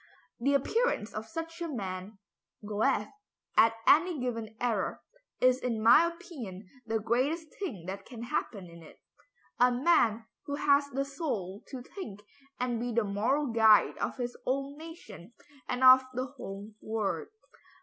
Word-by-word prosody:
"The 275 +4 +2
appearance 280 - 0
of 215 +1 -5
such 330 +6 -6
a 340 - -1
man 195 - -5 0.5
(Goethe) 210 0 +1 0.5
at 225 0 +5
any 330 0 +5
given 230 -3 -4
era, 225 -6 -1 0.4
is 255 0 +4
in 240 -3 -2
my 235 +10 +7
opinion 265 - -8 0.2
the 225 0 +1
greatest 265 +9 0
thing 235 - -5
that 190 +2 -6
can 235 -2 -9
happen 200 -5 -3
in 170 0 -13
it. 160 - -15 0.6
A 250 +1 +6
man 245 -5 +3 0.2
who 285 - -2
has 285 0 +3
the 275 0 -2
soul 235 - -4
to 255 -3 -7
think 225 - -8 0.4
and 245 -2 -1
be 245 +1 -2
the 235 0 +2
moral 225 +7 0
guide 220 -2 +5
of - - -2
his 245 -1 -3
own 275 +2 -1
nation 315 - -11 0.4
and 250 +1 -1
of 260 0 +9
the 255 +1 -1
whole 210 -6 -8
world." 210 -7 -2
245 Hz, 150 wpm, -30 LUFS, 215-280 Hz, 0.6 s, of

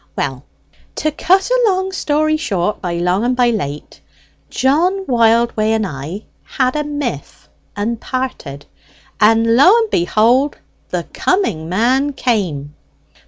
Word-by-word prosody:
Well, 135 0 -3 0.5
to 310 - -1
cut 380 +8 +1
a - - +3
long 380 -1 0
story 310 -3 0
short, 210 - -2
by 175 -2 -3
long 180 +4 0
and 250 +1 +1
by 245 -1 +3
late, 150 -9 -5 0.5
John 350 +9 +1
Wildway 230 - +2
and 220 -1 0
I 160 +5 -6 0.2
had 255 0 -1
a 300 - 0
miff 290 - -5 0.3
and 220 +3 -3
parted; 250 - -5 0.5
and 225 +2 +4
lo 360 - +6
and 450 -2 0
behold, 235 +10 +2 0.3
the - - -2
coming 210 - -1
man 255 +9 +1
came! 180 - -2
235 Hz, 130 wpm, -17 LUFS, 190-295 Hz, 0.5 s, lo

